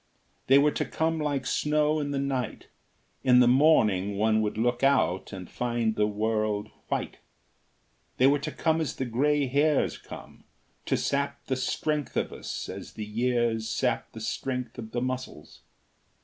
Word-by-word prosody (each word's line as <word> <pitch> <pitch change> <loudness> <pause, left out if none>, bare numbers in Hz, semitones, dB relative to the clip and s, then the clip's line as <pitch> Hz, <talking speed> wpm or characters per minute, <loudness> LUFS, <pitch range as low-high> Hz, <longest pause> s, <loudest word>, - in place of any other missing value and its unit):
They 135 - +7
were 145 +1 +4
to - - -2
come 160 0 -1
like 145 -3 -1
snow 150 +1 +1
in 145 -1 -2
the 140 - -2
night: 135 -3 -3 0.5
in 125 -1 +6
the 125 - +6
morning 110 -8 +4
one 110 +1 +3
would 105 0 -2
look 120 +2 0
out 135 -9 +2
and 95 -3 -7
find 120 -2 -1
the 105 -1 +2
world 105 0 -1 0.2
white; - - -3 1.0
they 130 - +4
were 140 +2 +4
to 155 +2 -4
come 160 +1 +1
as 155 - -2
the 130 - -2
gray 140 +5 +1
hairs 145 +2 +1
come, - - -12 0.4
to - - +2
sap 140 0 -2
the 130 - -1
strength 150 +2 -2
of - - -1
us - - -6
as - - -8
the 110 - -5
years 115 0 0
sap - - -1
the - - -8
strength 125 -2 -3
of 110 -2 -7
the 120 +2 -3
muscles. 130 -12 -6
125 Hz, 165 wpm, -27 LUFS, 110-145 Hz, 1.0 s, They